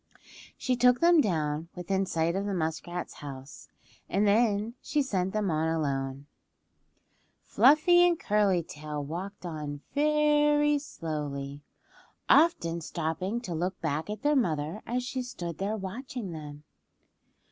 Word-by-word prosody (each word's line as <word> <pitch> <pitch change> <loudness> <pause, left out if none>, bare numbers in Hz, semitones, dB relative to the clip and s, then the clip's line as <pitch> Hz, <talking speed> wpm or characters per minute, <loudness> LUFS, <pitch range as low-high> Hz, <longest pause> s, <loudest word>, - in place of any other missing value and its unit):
She 255 - 0
took 250 0 +4
them 340 -1 +6
down 160 - -1
within 190 +2 -1
sight 165 0 0
of 200 +1 -1
the 200 - -1
muskrat's 175 +1 -3
house, 135 -1 -9 0.4
and 200 +2 +2
then 210 +1 +2
she 295 -2 0
sent 190 -7 -1
them 210 -3 0
on 155 +1 +1
alone. 140 -4 -2 1.2
Fluffy 330 +5 +5
and 340 -2 +1
Curly 200 -4 +2
Tail 150 -1 -6
walked 180 +7 -6
on 150 -4 -5
very 295 0 +3
slowly, 145 - -5 0.7
often 170 - +4
stopping 170 +8 -3
to 180 -8 -5
look 180 +3 -2
back 160 +2 -2
at 215 +5 -5
their 295 0 +3
mother 165 - 0
as 245 +1 -1
she 255 +1 -3
stood 175 -10 -6
there 205 +3 -1
watching 220 +1 -6
them. 150 -2 -8
185 Hz, 135 wpm, -29 LUFS, 155-245 Hz, 1.2 s, them